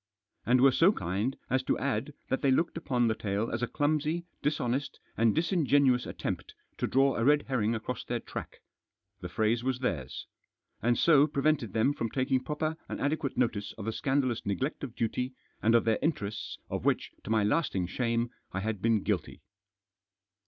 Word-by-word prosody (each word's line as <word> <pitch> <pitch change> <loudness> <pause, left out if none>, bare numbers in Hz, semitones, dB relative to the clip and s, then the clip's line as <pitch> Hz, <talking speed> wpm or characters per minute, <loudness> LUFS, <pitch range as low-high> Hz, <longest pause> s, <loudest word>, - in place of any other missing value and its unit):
And 125 +1 +5
were 135 0 +7
so 165 +9 +5
kind 100 - -2
as 130 0 +1
to - - 0
add 140 +1 -2
that 130 - 0
they 140 - +3
looked 160 +6 +2
upon 125 -7 +1
the 110 - +2
tale 105 +1 -2
as 120 - -2
a 125 - +1
clumsy, 155 +4 0 0.2
dishonest, 140 -2 -1 0.2
and 115 -1 +3
disingenuous 145 -7 +3
attempt - - -4 0.2
to - - 0
draw 135 0 +3
a 115 - +1
red 145 +3 +4
herring 115 -4 0
across 115 +2 -4
their 120 -1 -2
track— - - -8 0.6
the 90 - -6
phrase 110 +5 +1
was 130 -1 0
theirs! 80 - -3 0.3
— - - -48
and 120 +2 +2
so 150 -3 +5
prevented 140 -6 0
them 115 +6 +3
from 115 -5 -3
taking 130 +1 0
proper 155 +3 -2
and - - -4
adequate 145 -1 -1
notice 110 -5 0
of 105 - -6
the 110 - -1
scandalous 135 -4 0
neglect 130 +11 -2
of 125 -4 -6
duty, 125 +3 -2 0.3
and 115 +2 +4
of 115 - +4
their 115 -1 +2
interests, 110 -10 -2
of - - -4
which, - - +1
to - - -8
my 110 -1 +3
lasting 105 - +1
shame, 115 +4 -1 0.2
I 95 - -3
had 105 -2 -3
been 110 -2 +2
guilty. 100 -6 -2
125 Hz, 185 wpm, -30 LUFS, 110-140 Hz, 0.6 s, were